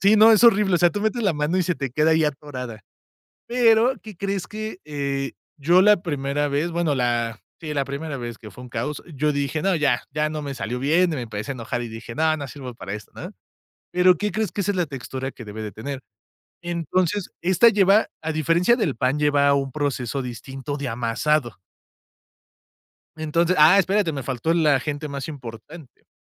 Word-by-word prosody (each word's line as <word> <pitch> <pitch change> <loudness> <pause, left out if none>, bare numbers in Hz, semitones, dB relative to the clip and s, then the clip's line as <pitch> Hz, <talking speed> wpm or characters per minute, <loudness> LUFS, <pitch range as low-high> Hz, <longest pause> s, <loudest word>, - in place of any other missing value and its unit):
Sí, 200 +2 +5
no, 220 +1 +8
es 215 - +4
horrible, 210 -5 +5
o - - +3
sea, 175 0 +4
tú 205 - -4
metes 220 +3 0
la 195 -4 +2
mano 150 +4 -1
y - - +3
se 180 0 0
te 135 -3 -4
queda 150 +5 +2
ahí 160 -1 +3
atorada. 130 -6 -5 0.7
Pero, 240 +1 +4
¿qué 215 -4 -10
crees? 195 0 -3
Que, 215 -2 -6
eh, 140 -2 -3 0.2
yo 170 +6 +4
la 210 0 +6
primera 145 -2 -1
vez, 145 +5 -1
bueno, 165 -3 0
la 120 -3 -1 0.2
sí, 155 -2 -5
la 140 -1 +1
primera 140 +2 -5
vez, 120 -3 -6
que 105 - -11
fue 125 +6 -12
un 125 - -10
caos, 150 0 -3
yo 150 +2 +1
dije: 145 +2 -1
"No, 195 -1 +2
ya, 145 -6 +1
ya 150 0 0
no 155 - -4
me 140 -1 -5
salió 125 -1 -4
bien," 165 +6 +2
y - - -2
me 125 - -3
empecé 110 +2 -5
a - - -2
enojar, 120 0 -4
y 120 - -5
dije: 115 +1 -8
"No, 155 +2 +2
no 140 -2 -5
sirvo 130 -2 -8
para 100 -3 -6
esto," 105 -2 -9
¿no? - - -7 0.6
Pero, 180 0 +4
¿qué 210 +2 -1
crees? 215 -1 -1
Que 200 - -2
esa 205 +2 0
es 190 - -4
la 175 - +2
textura, 135 -1 -6
que 120 - -11
debe 105 +1 -7
de 105 - -5
tener. 135 +4 -6 0.6
Entonces, 175 +3 -1
esta 190 +6 +5
lleva, 200 0 +4
a 160 0 -2
diferencia 165 - +3
del 200 - -1
pan, 130 +4 0
lleva 145 -1 +3
un 135 -1 0
proceso 140 -2 -2
distinto 130 +4 -6
de 140 -2 -4
amasado. 120 +3 0 1.6
Entonces, 165 +3 +1
ah, 160 +6 +7
espérate, 195 -1 +2
me 135 -2 -4
faltó 130 +4 -2
el 165 -2 +2
agente 145 +1 +1
más 140 0 -5
importante, 135 +2 -10
150 Hz, 210 wpm, -23 LUFS, 130-180 Hz, 1.6 s, no